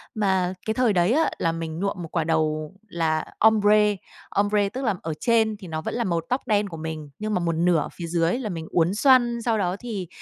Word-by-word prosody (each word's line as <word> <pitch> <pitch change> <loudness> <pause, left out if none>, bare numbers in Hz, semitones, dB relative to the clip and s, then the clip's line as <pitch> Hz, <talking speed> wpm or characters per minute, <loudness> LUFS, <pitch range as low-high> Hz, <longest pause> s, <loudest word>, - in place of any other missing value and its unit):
Mà 190 -3 +1
cái 220 - 0
thời 245 -5 +2
đấy 180 +6 +3
á, 320 - +3
là 165 - +1
mình 165 0 -5
nhuộm 200 0 -2
một 160 - -7
quả 165 -3 0
đầu 155 -1 -1
là 160 -3 -1
ombre. 210 -1 +4 0.3
Ombre 205 0 +1
tức 260 +4 -5
là 210 -4 +1
ở 160 -1 -3
trên 220 -3 +2
thì 190 -3 -11
nó 160 -1 -4
vẫn - - -4
là 240 - 0
màu 170 -4 0
tóc 255 +2 -2
đen 205 -2 +1
của 165 - -8
mình 155 -2 -6
nhưng 215 0 -2
mà 180 - +1
một 170 -1 0
nửa 170 0 +3
ở - - -3
phía 170 -2 -6
dưới 170 +7 +1
là 220 -5 -4
mình 165 -3 -5
uốn 170 +1 +2
xoăn, 240 -2 +4
sau 230 -2 +1
đó 180 -2 0
thì 210 -8 -5
190 Hz, 240 wpm, -24 LUFS, 165-220 Hz, 0.3 s, ombre